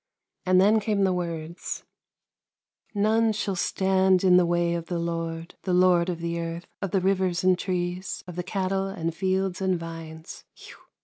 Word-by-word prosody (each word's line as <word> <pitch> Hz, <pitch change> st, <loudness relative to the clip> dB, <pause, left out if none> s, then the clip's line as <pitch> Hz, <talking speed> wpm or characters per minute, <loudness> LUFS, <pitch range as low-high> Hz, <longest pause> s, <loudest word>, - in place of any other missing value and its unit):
And 185 Hz, 0 st, +5 dB
then 210 Hz, +3 st, +5 dB
came 205 Hz, -1 st, 0 dB
the 190 Hz, -1 st, +3 dB
words: 170 Hz, -1 st, -4 dB, 0.5 s
" -, -, -49 dB, 0.2 s
None 225 Hz, 0 st, +3 dB
shall 200 Hz, -2 st, -2 dB
stand 190 Hz, 0 st, +2 dB
in 185 Hz, -1 st, +6 dB
the 180 Hz, -1 st, +5 dB
way 175 Hz, 0 st, +1 dB
of 170 Hz, -1 st, -4 dB
the 175 Hz, -, -2 dB
lord, 165 Hz, 0 st, -3 dB
The 185 Hz, -2 st, 0 dB
lord 180 Hz, -1 st, +4 dB
of 170 Hz, -2 st, -3 dB
the 170 Hz, 0 st, -2 dB
Earth 170 Hz, +1 st, -5 dB
— -, -, -68 dB
of 195 Hz, -, -2 dB
the 190 Hz, +1 st, +1 dB
rivers 185 Hz, -2 st, +1 dB
and 185 Hz, 0 st, +5 dB
trees, 180 Hz, 0 st, -3 dB
Of 180 Hz, -2 st, -9 dB
the 180 Hz, -, -2 dB
cattle 190 Hz, +1 st, -1 dB
and 165 Hz, -4 st, -3 dB
fields 190 Hz, +1 st, -1 dB
and 190 Hz, -1 st, +1 dB
vines 165 Hz, -1 st, -8 dB
180 Hz, 180 wpm, -26 LUFS, 170-190 Hz, 0.5 s, in